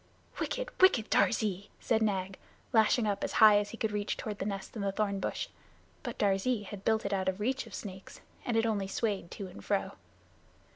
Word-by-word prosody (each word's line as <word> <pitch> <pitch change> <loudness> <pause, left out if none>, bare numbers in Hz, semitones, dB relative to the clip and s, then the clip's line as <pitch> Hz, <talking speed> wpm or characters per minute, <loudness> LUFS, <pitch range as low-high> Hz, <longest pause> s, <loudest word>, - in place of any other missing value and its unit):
"Wicked, - - -2
wicked 255 - +5
Darzee!" 205 -4 +2
said 225 -2 +1
Nag, 195 -3 -1 0.3
lashing 220 +1 +4
up 200 -1 -1
as - - -2
high 215 -2 +8
as 205 0 -3
he 230 - -8
could 220 -1 -1
reach 205 0 -2
toward 210 -2 -5
the 195 - -2
nest 195 +1 -5
in 215 - -3
the 200 0 0
thorn 200 -1 -1
bush. - - -2 0.5
But - - -5
Darzee 205 +3 +1
had 200 0 -8
built 220 -1 +2
it 200 - -1
out 190 -1 +1
of 190 +1 -4
reach 260 +5 -1
of - - -8
snakes, 190 -2 -8 0.2
and 235 -2 0
it 225 - +3
only 205 -4 0
swayed 195 -3 -2
to 200 - -6
and 180 - -10
fro. - - 0
205 Hz, 205 wpm, -31 LUFS, 195-220 Hz, 0.5 s, high